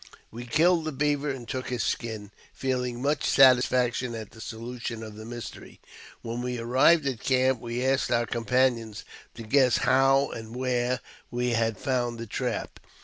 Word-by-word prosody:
We 120 Hz, +2 st, -8 dB
killed 165 Hz, +4 st, +3 dB
the 155 Hz, -, -2 dB
beaver 145 Hz, +1 st, 0 dB
and 130 Hz, -4 st, -5 dB
took 130 Hz, +2 st, -4 dB
his 125 Hz, -1 st, -1 dB
skin, 110 Hz, -3 st, -3 dB, 0.2 s
feeling 125 Hz, -2 st, -2 dB
much 145 Hz, 0 st, 0 dB
satis 130 Hz, -2 st, +6 dB
faction 125 Hz, -1 st, 0 dB
at 110 Hz, -3 st, -7 dB
the 110 Hz, -, -13 dB
solution 115 Hz, -1 st, -6 dB
of 110 Hz, -1 st, -8 dB
the 110 Hz, +1 st, -9 dB
mystery. 120 Hz, 0 st, -9 dB, 0.4 s
When 120 Hz, +1 st, -4 dB
we 125 Hz, 0 st, -3 dB
arrived 130 Hz, +7 st, +4 dB
at 130 Hz, -5 st, -2 dB
camp 130 Hz, -1 st, +2 dB
we 120 Hz, +2 st, -3 dB
asked 135 Hz, +1 st, +1 dB
our 120 Hz, 0 st, +2 dB
companions 120 Hz, -2 st, 0 dB, 0.3 s
to 115 Hz, -, -8 dB
guess 125 Hz, +2 st, +3 dB
how 135 Hz, +1 st, +3 dB
and 115 Hz, +1 st, -8 dB
where 125 Hz, 0 st, 0 dB, 0.3 s
we 125 Hz, 0 st, -1 dB
had 115 Hz, -2 st, 0 dB
found 120 Hz, -3 st, -1 dB
the 115 Hz, -, -6 dB
trap. -, -, -4 dB
125 Hz, 170 wpm, -27 LUFS, 115-130 Hz, 0.4 s, satis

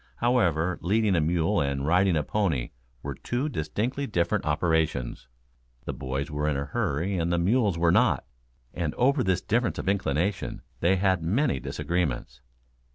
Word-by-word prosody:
However, 90 Hz, -9 st, +1 dB
leading 105 Hz, +2 st, +2 dB
a 85 Hz, -, +3 dB
mule 85 Hz, +4 st, +1 dB
and 70 Hz, -1 st, -1 dB
riding 90 Hz, +3 st, +3 dB
a 75 Hz, -, +1 dB
pony 80 Hz, -, -1 dB, 0.3 s
were -, -, -3 dB
two 125 Hz, +5 st, -2 dB
distinctly 115 Hz, -, -2 dB
different 85 Hz, -6 st, 0 dB
operations. 80 Hz, -6 st, 0 dB, 0.6 s
The -, -, -3 dB
boys 65 Hz, +3 st, -4 dB
were 75 Hz, 0 st, -1 dB
in 70 Hz, -, 0 dB
a 70 Hz, -, -2 dB
hurry 85 Hz, +7 st, -1 dB
and 85 Hz, +1 st, 0 dB
the 85 Hz, -, +2 dB
mules 100 Hz, +1 st, +2 dB
were 85 Hz, 0 st, +3 dB
not -, -, +3 dB, 0.5 s
and 85 Hz, -4 st, -2 dB
over 135 Hz, +1 st, +3 dB
this 95 Hz, -1 st, +1 dB
difference 120 Hz, +2 st, 0 dB
of -, -, -5 dB
inclination 95 Hz, -1 st, -1 dB, 0.2 s
they 90 Hz, +3 st, +3 dB
had 95 Hz, -2 st, +2 dB
many 100 Hz, -, +1 dB
disagreements. 70 Hz, -9 st, -2 dB
85 Hz, 160 wpm, -27 LUFS, 75-100 Hz, 0.6 s, a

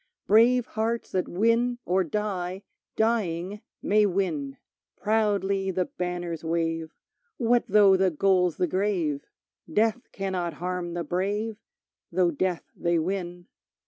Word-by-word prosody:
Brave 235 Hz, +3 st, +5 dB
hearts 225 Hz, 0 st, -2 dB
that 185 Hz, -1 st, 0 dB
win 230 Hz, +5 st, +2 dB
or 185 Hz, +2 st, +2 dB
die, 190 Hz, 0 st, -3 dB, 0.3 s
Dying, 205 Hz, -3 st, 0 dB, 0.2 s
may 210 Hz, 0 st, +4 dB
win; 160 Hz, -8 st, -2 dB, 0.4 s
Proudly 200 Hz, -2 st, +1 dB
the 185 Hz, -1 st, 0 dB
banners 175 Hz, -2 st, -4 dB
wave, 165 Hz, -1 st, -2 dB, 0.4 s
What 240 Hz, -1 st, +2 dB
though 200 Hz, -1 st, +6 dB
the 190 Hz, 0 st, +3 dB
goal's 180 Hz, +1 st, +2 dB
the 180 Hz, -, +2 dB
grave? 175 Hz, -5 st, -1 dB, 0.4 s
Death 225 Hz, +6 st, +1 dB
cannot 185 Hz, -3 st, -2 dB
harm 180 Hz, -1 st, -4 dB
the 175 Hz, -, -2 dB
brave, 205 Hz, +5 st, -2 dB, 0.5 s
Through 175 Hz, 0 st, +2 dB
death 180 Hz, +2 st, -1 dB
they 170 Hz, 0 st, +1 dB
win. 175 Hz, 0 st, -3 dB
190 Hz, 120 wpm, -26 LUFS, 175-210 Hz, 0.5 s, though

